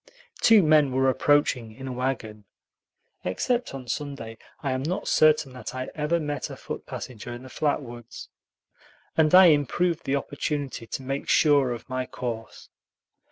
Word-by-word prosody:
Two 225 -4 +6
men 155 -3 +4
were 130 +1 +2
approaching 130 -5 +2
in 135 +2 -8
a - - -4
wagon 120 -5 -3 0.8
(except 240 - -1
on 130 -2 -8
Sunday, 115 -3 -5 0.2
I 140 - 0
am 130 0 -1
not 170 +7 -3
certain 155 -3 +4
that 125 - -7
I 130 0 -4
ever 155 +3 0
met 145 -3 -3
a - - -7
foot - - -7
passenger 120 -1 -7
in 120 +1 -8
the 130 - -11
flat 145 +2 0
woods), 120 -2 -10 0.9
and 160 +1 +4
I 190 0 +10
improved 160 +3 +1
the 135 - +1
opportunity 140 -3 -3
to 130 - -5
make 135 +2 -4
sure 145 -4 +4
of 120 -2 -6
my 130 0 -3
course. 115 -3 -6
135 Hz, 160 wpm, -26 LUFS, 125-150 Hz, 0.9 s, I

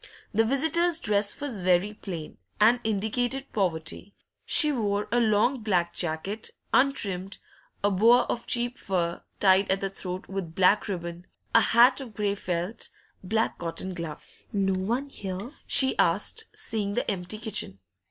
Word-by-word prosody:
The 225 +2 +3
visitor's 320 +7 +1
dress 205 -4 +1
was 265 -9 -3
very 180 +3 +2
plain, 170 - -8 0.2
and 230 +4 +5
indicated 230 +5 -1
poverty; 180 0 -2 0.3
she 300 -1 +6
wore 210 -5 -1
a 240 - +3
long 225 +3 +2
black 180 -5 0
jacket, 175 +6 -2 0.2
untrimmed, 200 -8 +1 0.5
a 205 - +3
boa 230 +6 +5
of 235 - -4
cheap 240 +1 0
fur, 175 -3 -2 0.2
tied 190 0 +4
at 190 - +3
the 195 -1 -3
throat 185 -1 -6
with 190 -4 -6
black 190 +3 +3
ribbon, 175 -2 -6 0.3
a 230 - +7
hat 245 +5 +5
of 235 -6 -10
grey 205 -2 0
felt, 180 +2 -4 0.3
black 220 +4 -1
cotton 170 +2 -4
gloves. 165 -4 -7
'No 195 -2 0
one 235 +9 -2
here?' 195 0 -6 0.2
she 265 -1 +6
asked, 205 - +2
seeing 205 -2 -2
the - - -1
empty 185 +2 -4
kitchen. 215 - -3
205 Hz, 150 wpm, -26 LUFS, 185-235 Hz, 0.5 s, a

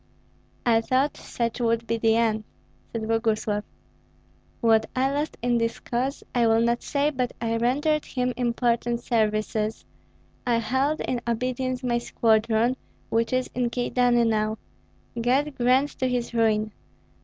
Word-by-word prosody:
"I 225 -2 +4
thought 260 +5 +1
such 235 0 -3
would 230 -1 +1
be 230 +1 -1
the 225 0 +3
end," 220 -2 +1 0.5
said 230 -1 -3
Boguslav. 220 -2 0 1.0
"What 225 -1 +3
I 265 +1 +2
lost 295 +2 -2
in 240 -1 +2
his 230 0 -1
cause 255 +3 -2
I 240 -2 +3
will 225 0 +4
not 235 +1 +1
say, 290 +1 0
but 255 -3 -2
I 230 -1 -1
rendered 290 +6 +1
him 250 -1 -1
important 240 -1 0
services. 215 -1 0 0.6
I 240 -2 +1
held 265 +6 0
in 245 -2 -2
obedience 255 +2 -1
my 240 -1 +1
squadron, 225 +1 +2 0.3
which 230 0 +1
is 255 0 +1
in 245 -1 0
Kyedani 245 0 +2
now, 215 0 0 0.6
God 275 +5 +1
grant 255 +4 +3
to 260 - +1
his 245 -1 -2
ruin! 220 -2 +2
235 Hz, 145 wpm, -25 LUFS, 225-255 Hz, 1.0 s, I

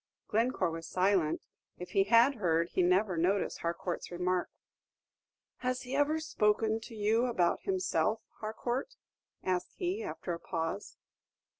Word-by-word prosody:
Glencore 220 -5 +1
was 165 0 -6
silent; 185 -4 +2 0.3
if 180 0 -8
he 195 +1 +3
had 235 +5 +6
heard, 170 -4 +1
he - - +1
never 180 +1 +3
noticed 185 +4 +1
Harcourt's 170 +1 -3
remark. 180 +1 0 1.1
"Has 255 0 -2
he 255 +2 -4
ever 295 +2 +2
spoken 220 -6 +1
to 225 0 -10
you 220 +3 +2
about 180 -8 +1
himself, 370 - +1 0.2
Harcourt?" 240 - -3 0.5
asked 180 -1 -1
he, 370 +4 -2
after 350 - -4
a 170 - -5
pause. 165 +4 -4
205 Hz, 135 wpm, -32 LUFS, 180-240 Hz, 1.1 s, had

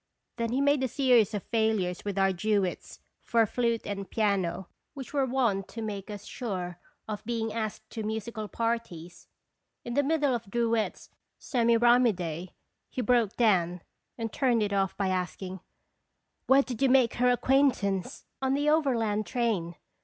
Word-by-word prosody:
Then 230 -1 -1
he 260 +3 +1
made 285 -1 +3
a 260 - +1
series 245 -5 +3
of 205 - -3
failures 220 -6 0
with 200 -1 -4
our 195 0 +3
duets 195 0 -1 0.2
for 230 -1 +2
flute 235 +1 -1
and 200 -1 -5
piano 195 -4 0 0.3
which 270 0 -8
were 275 -2 +1
wont 235 -7 0
to 230 - -7
make 205 -2 -5
us 205 -1 -7
sure 180 -7 -5 0.3
of 215 -1 -5
being 225 -2 -2
asked 220 -1 -4
to 225 - -5
musical 220 0 -4
par 230 +2 0
ties. 175 -5 -13 0.6
In 240 - -4
the 285 - +3
middle 290 -2 +1
of 230 -4 -4
Drouet's 230 0 -1 0.2
" - - -54
Semiram 240 -1 +4
ide" 175 -3 -3 0.4
he 255 - -3
broke 235 -3 +2
down, 180 -6 +2 0.3
and 225 -2 -4
turned 245 -5 +2
it 200 -1 -1
off 195 -1 0
by 195 -2 0
asking: 185 +1 -3 0.9
"Where 270 +1 +6
did 245 -3 -6
you 270 - +4
make 255 -3 +4
her 250 +1 +4
acquaintance?" 245 -7 +1
" - - -52
On 265 0 +1
the 290 +1 +2
overland 230 - +1
train. 200 -8 -1
225 Hz, 170 wpm, -28 LUFS, 195-245 Hz, 0.9 s, Where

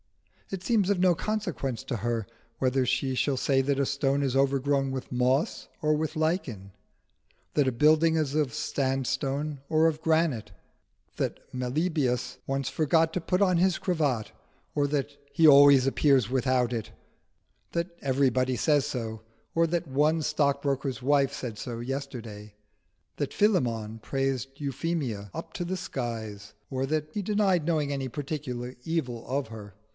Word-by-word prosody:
It 190 -2 -5
seems 210 -5 +2
of 200 -3 +2
no 180 -1 +4
consequence 180 - -2
to 120 - -2
her 115 -1 -2 0.3
whether 130 0 +1
she 130 +1 0
shall 135 +1 +1
say 135 +1 +2
that 140 +1 0
a 140 - +2
stone 140 0 0
is 135 -2 0
overgrown 135 0 +2
with 130 -1 -5
moss 125 +4 0
or 155 0 +3
with 155 +1 -2
lichen, 150 - -1 0.8
that 145 -3 +3
a - - -2
building 155 +6 +4
is 150 -3 0
of 145 -6 +1
sandstone 135 +2 -1
or 160 0 +4
of 160 -1 -1
granite, 160 -8 +1 0.7
that - - -2
Meliboeus 130 -1 -1
once 135 -1 -1
forgot 160 +1 +2
to 180 - -1
put 180 +3 0
on 185 -3 +3
his 185 +1 +3
cravat 145 - -1 0.4
or 145 -1 +2
that 145 0 -2 0.2
he 160 +3 +5
always 140 -2 +8
appears 135 -4 +3
without 130 -2 +1
it; 115 -3 -4 0.8
that 170 +1 -2
everybody 130 -2 +1
says 145 -1 +3
so, 115 -6 -4 0.3
or 165 0 +4
that 170 0 -1
one 150 +4 +2
stock 145 -2 +1
broker's 135 -3 -1
wife 140 +1 +3
said 115 -5 -6
so 115 0 -5
yesterday; 120 -5 -6 0.6
that - - -2
Philemon 115 - +1
praised 135 +2 -2
Euphemia 140 -7 -3
up - - -7
to 175 - -3
the 185 +2 -3
skies, 110 - -5 0.2
or 130 0 -1
that 155 +1 -1
he 210 - -1
denied 195 -5 +2
knowing 155 -4 0
any 135 -1 -3
particular 130 -3 -5
evil 130 -8 -2
of 135 0 -1
her. 105 -3 -10
140 Hz, 155 wpm, -28 LUFS, 125-155 Hz, 0.8 s, always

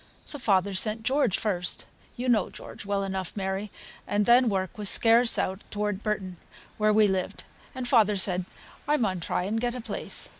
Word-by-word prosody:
So 290 - -2
father 200 -4 +2
sent 215 +3 -1
George 260 -4 +2
first 180 -5 -2 0.3
(you 250 +1 -4
know 220 -6 +3
George, 205 - -10
well 200 -1 0
enough, 190 0 -4
Mary), 195 +1 -2 0.4
and 205 0 +1
then 240 +1 +5
work 190 +1 -2
was 205 -2 +4
scarce 230 +1 +5
out 190 +2 -1
toward 210 -1 -2
Burton, 195 -5 -3 0.4
where 215 0 +4
we 215 0 +5
lived, 190 -2 -2 0.3
and 255 -1 -4
father 220 -5 +4
said 185 -1 0 0.4
I 300 +1 +3
maun 190 -8 0
try 170 - -1
and 220 +4 -1
get 245 0 -1
a - - -4
place. - - -6
210 Hz, 185 wpm, -27 LUFS, 190-230 Hz, 0.4 s, then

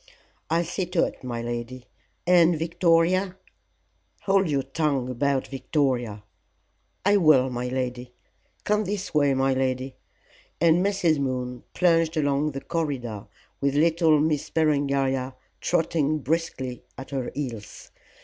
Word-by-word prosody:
"I'll 165 +2 +2
see 175 +2 -3
to 180 -1 +1
it, - - -8
my 120 -2 -4
lady. 120 +1 -5 0.4
And 175 -1 +5
Victoria 170 +3 +2 0.4
?" 90 0 -43
"Hold 195 -3 +2
your 140 -2 0
tongue 135 -2 -1
about 135 +1 0
Victoria." 130 -6 -1 0.8
"I 205 +1 +5
will, 145 -8 +4
my 125 0 -3
lady. 125 -1 -3 0.5
Come 210 0 +1
this 200 0 -4
way, 145 -3 +3
my 135 0 +2
lady," 130 0 -2 0.6
and 170 +2 +4
Mrs. 185 -6 +1
Moon 125 -2 -3
plunged 165 -2 +2
along 145 0 +1
the 135 - -5
corridor 135 -11 -3 0.3
with 140 0 0
little 160 0 +4
Miss 150 -1 0
Berengaria 140 -4 0 0.2
trotting 160 -3 +1
briskly 140 -4 -3
at 135 0 -9
her 135 -3 -2
heels. 120 -7 -6
140 Hz, 130 wpm, -25 LUFS, 130-165 Hz, 0.8 s, And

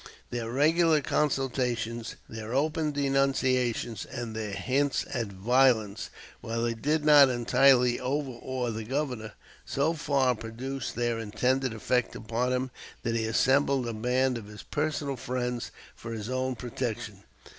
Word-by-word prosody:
Their 120 -2 -3
regular 155 +5 +4
consultations, 125 -5 -1
their 110 +2 -6
open 155 +2 +1
denunciations, 130 -5 +1
and 120 -3 -6
their 110 -1 -3
hints 135 +8 0
at 120 -3 -1
violence, 110 +1 +2 0.3
while 115 +1 -3
they 120 0 +1
did 150 +6 0
not 145 -3 +8
entirely 125 0 +4
overawe 130 -2 -2
the 110 0 -4
Governor, 125 -3 -3 0.3
so 145 +4 0
far 140 -5 +2
produced 120 +4 -5
their 120 -1 0
intended 125 +4 0
effect 125 +2 0
upon 115 +3 -1
him 130 0 -1 0.3
that 115 0 -1
he 115 -1 0
assembled 130 +3 +2
a 115 - -3
band 125 +3 +1
of 105 - -11
his 105 0 -10
personal 145 -2 -2
friends 125 -1 -3 0.3
for 115 0 -7
his 110 0 -5
own 130 0 -1
protection. 120 -4 -4
125 Hz, 135 wpm, -28 LUFS, 115-135 Hz, 0.3 s, not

